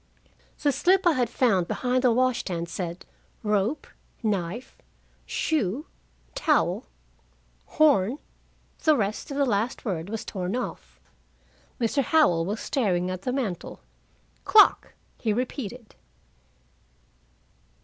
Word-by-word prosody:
The 290 - +2
slip 365 +8 +2
I 345 - +6
had 250 -6 0
found 200 -9 +2
behind 255 0 0
the 250 - +5
wash 255 +1 +2
stand 170 -3 -3
said 175 -1 -5 0.4
"Rope, 210 +6 0 0.4
knife, 205 +2 -2 0.5
shoe, 280 - -1 0.5
towel. - - +1 0.9
Horn 270 -6 +4 0.3
" - - -33
The 310 -2 +5
rest 210 -1 -2
of 280 - -4
the 280 - +3
last 230 +2 -1
word 180 -4 -3
was 225 0 -4
torn 185 +1 -3
off. 250 - -6 0.8
Mr. 245 +4 +1
Howell 240 - +3
was 210 +3 -2
staring 185 -9 0
at 185 0 -5
the 250 - -2
mantel. 235 -10 -4 0.6
"Clock!" 425 -1 +5 0.2
he 220 - 0
repeated. 245 -1 -4
230 Hz, 120 wpm, -26 LUFS, 190-265 Hz, 0.9 s, I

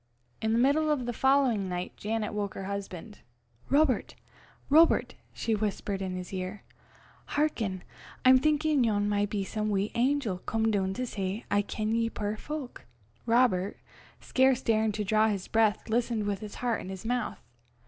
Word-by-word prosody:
In 220 - 0
the 225 - +2
middle 285 +5 +3
of 285 -5 0
the 240 - -2
following 260 -6 +2
night, 180 0 -4
Janet 215 0 -2
woke 205 -2 -3
her - - -5
husband. 200 +1 -6 0.5
"Robert! 280 -3 +2 0.5
Robert!" 320 +4 +5 0.2
she 225 - -2
whispered 205 -2 -2
in 185 -1 -3
his 180 +1 -7
ear, 185 +2 -5 0.7
"hearken. 220 -11 0 0.4
I'm 255 0 +8
thinkin' 305 -1 +2
yon 205 -3 +1
maun 205 0 +1
be 205 -1 -2
some 215 +2 -2
wee 200 0 0
angel 245 -6 +1
come 225 +3 0
doon 190 -2 0
to 255 - -2
say, 200 0 -4
'I 205 - +4
ken 215 +1 -3
ye, 230 0 +1
puir 210 -1 -3
fowk.'" 290 +2 -7 0.4
Robert, 230 -5 +2 0.4
scarce 260 -1 +2
daring 220 -1 +2
to 210 - -2
draw 215 +1 +3
his 200 -4 -2
breath, 220 -2 +2
listened 230 -1 0
with 200 -2 -1
his 210 -1 -8
heart 240 -2 -1
in - - -8
his 190 +2 -7
mouth. 245 -1 -1
220 Hz, 170 wpm, -29 LUFS, 200-250 Hz, 0.7 s, I'm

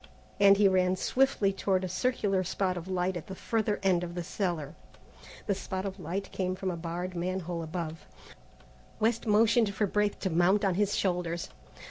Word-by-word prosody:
and 200 0 +7
he 205 -1 +5
ran 185 -1 +3
swiftly 220 -2 +2
toward 190 -1 0
a - - -1
circular 195 -1 0
spot 185 +1 -1
of 175 0 -6
light 185 0 -1
at 170 - -6
the 190 - -6
further 215 0 -1
end 180 -2 +3
of 175 0 -6
the 175 - -3
cellar. 170 -6 -3 0.7
The 205 - +1
spot 190 0 -4
of 195 0 -5
light 185 +4 -4
came 185 -1 -2
from 185 0 -2
a - - -4
barred 175 +2 -4
man 185 +2 -2
hole 170 0 -4
above. 165 0 -5 0.9
West 225 +1 +1
motioned 220 +1 +4 0.2
Braith 210 -1 +1
to 190 - -1
mount 180 +5 +3
on 190 - +2
his 205 +2 +1
shoulders. 175 -2 -1
185 Hz, 180 wpm, -29 LUFS, 175-200 Hz, 0.9 s, and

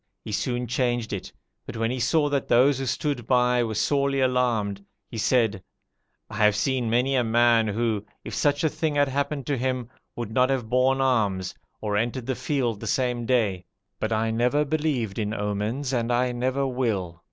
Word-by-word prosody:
He - - -5
soon 120 +3 -1
changed 120 -2 -1
it, 100 - -5 0.4
but 115 - -6
when 115 +1 0
he 130 - -3
saw 145 +5 +2
that 140 -2 -1
those 130 +3 +4
who 135 - -3
stood 125 -2 -2
by 125 -1 +3
were 110 -2 -3
sorely 140 +3 +1
alarmed, 120 -6 +1 0.3
he 115 - -5
said, 110 -4 +2 0.7
'I 105 - -8
have 105 -1 +4
seen 125 0 0
many 125 +4 +2
a 125 - +3
man 115 0 +3
who, 110 -1 -1 0.2
if - - -7
such 145 0 +1
a 160 - +3
thing 155 0 -2
had 145 -1 +3
happened 140 0 -2
to 140 0 -1
him, 130 -2 -2 0.3
would 115 -3 -5
not 125 +2 +3
have 130 -4 -1
borne 130 +2 +3
arms, 105 -8 +1 0.3
or 105 -1 -1
entered 120 +3 -1
the 130 - -1
field 125 -6 -1
the - - -6
same 125 -3 0
day; 105 -8 +1 0.4
but 110 - -2
I 110 0 +1
never 125 +6 +2
believed 140 -9 -1
in 105 0 -2
omens, 105 +7 -2
and 120 -1 0
I 125 +1 +2
never 130 +3 -1
will. 110 -10 -2
125 Hz, 190 wpm, -25 LUFS, 110-135 Hz, 0.7 s, those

